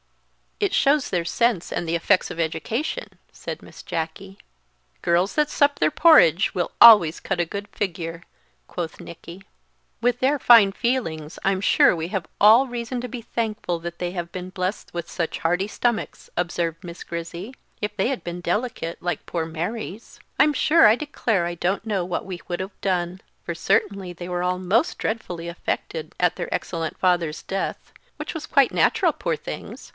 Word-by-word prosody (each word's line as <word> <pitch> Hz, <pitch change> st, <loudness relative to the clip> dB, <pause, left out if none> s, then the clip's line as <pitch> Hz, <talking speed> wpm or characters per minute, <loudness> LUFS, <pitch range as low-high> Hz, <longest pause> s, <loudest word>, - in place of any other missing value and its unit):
"It 405 Hz, -3 st, 0 dB
shows 285 Hz, 0 st, +3 dB
their 175 Hz, -2 st, -1 dB
sense 230 Hz, 0 st, +1 dB
and 170 Hz, -, -2 dB
the 165 Hz, -, 0 dB
effects 185 Hz, +3 st, +2 dB
of 170 Hz, -, -7 dB
education," 225 Hz, -, -3 dB
said -, -, -7 dB
Miss -, -, -12 dB
Jacky. 165 Hz, +5 st, -5 dB, 0.6 s
"Girls 175 Hz, +3 st, +2 dB
that 300 Hz, -1 st, +2 dB
sup 285 Hz, 0 st, +2 dB
their 155 Hz, -, +4 dB
porridge 200 Hz, -, +5 dB
will 175 Hz, -2 st, -1 dB
always 195 Hz, -9 st, +8 dB
cut -, -, -3 dB
a 175 Hz, -, +2 dB
good 200 Hz, +4 st, -6 dB
figure," 170 Hz, -5 st, -4 dB, 0.4 s
quoth 170 Hz, -3 st, -5 dB
Nicky. 170 Hz, +2 st, -11 dB, 0.6 s
"With 245 Hz, +1 st, +1 dB
their 275 Hz, +3 st, +2 dB
fine 230 Hz, -7 st, +7 dB
feelings 170 Hz, -10 st, -2 dB
I'm 190 Hz, -1 st, +1 dB
sure 190 Hz, -, +5 dB
we 165 Hz, 0 st, -4 dB
have 190 Hz, -5 st, -3 dB
all 225 Hz, +6 st, +7 dB
reason 240 Hz, 0 st, -4 dB
to 250 Hz, -, -4 dB
be 240 Hz, -1 st, -7 dB
thankful 215 Hz, -7 st, -2 dB
that 170 Hz, +1 st, -7 dB
they 175 Hz, -1 st, -3 dB
have 175 Hz, -2 st, -5 dB
been 185 Hz, 0 st, -6 dB
blest 185 Hz, +2 st, -4 dB
with 170 Hz, -1 st, -5 dB
such 170 Hz, -3 st, -3 dB
hearty 180 Hz, +4 st, 0 dB
stomachs," 235 Hz, +1 st, -2 dB
observed 170 Hz, -1 st, -2 dB
Miss 170 Hz, -1 st, -8 dB
Grizzy; 170 Hz, +7 st, -6 dB, 0.3 s
"if 210 Hz, 0 st, -3 dB
they 200 Hz, +3 st, +1 dB
had 265 Hz, -10 st, -3 dB
been 175 Hz, 0 st, -5 dB
delicate, 175 Hz, -2 st, -2 dB
like 175 Hz, 0 st, -3 dB
poor 165 Hz, -2 st, -2 dB
Mary's, 185 Hz, +6 st, -6 dB, 0.2 s
I'm 300 Hz, -, +5 dB
sure 310 Hz, -1 st, +5 dB
I 215 Hz, -, +6 dB
declare 235 Hz, -, -1 dB
I 175 Hz, 0 st, -3 dB
don't 190 Hz, +5 st, -1 dB
know 200 Hz, -5 st, -1 dB
what 180 Hz, -, -3 dB
we 185 Hz, -2 st, -6 dB
would 175 Hz, -, -3 dB
have 190 Hz, +1 st, -6 dB
done; 180 Hz, -1 st, -1 dB, 0.2 s
for 170 Hz, -, -4 dB
certainly 190 Hz, +1 st, 0 dB
they 175 Hz, +1 st, -8 dB
were 180 Hz, 0 st, -2 dB
all 180 Hz, 0 st, 0 dB
most 225 Hz, -, +1 dB
dreadfully 180 Hz, -7 st, -3 dB
affected 175 Hz, -, -4 dB
at -, -, +2 dB
their -, -, -5 dB
excellent 165 Hz, -2 st, -3 dB
father's 175 Hz, -4 st, +1 dB
death; 195 Hz, 0 st, -4 dB, 0.3 s
which -, -, -6 dB
was 320 Hz, -, -5 dB
quite 275 Hz, -2 st, +3 dB
natural, -, -, +3 dB
poor -, -, -2 dB
things! -, -, -8 dB
185 Hz, 180 wpm, -23 LUFS, 170-230 Hz, 0.6 s, always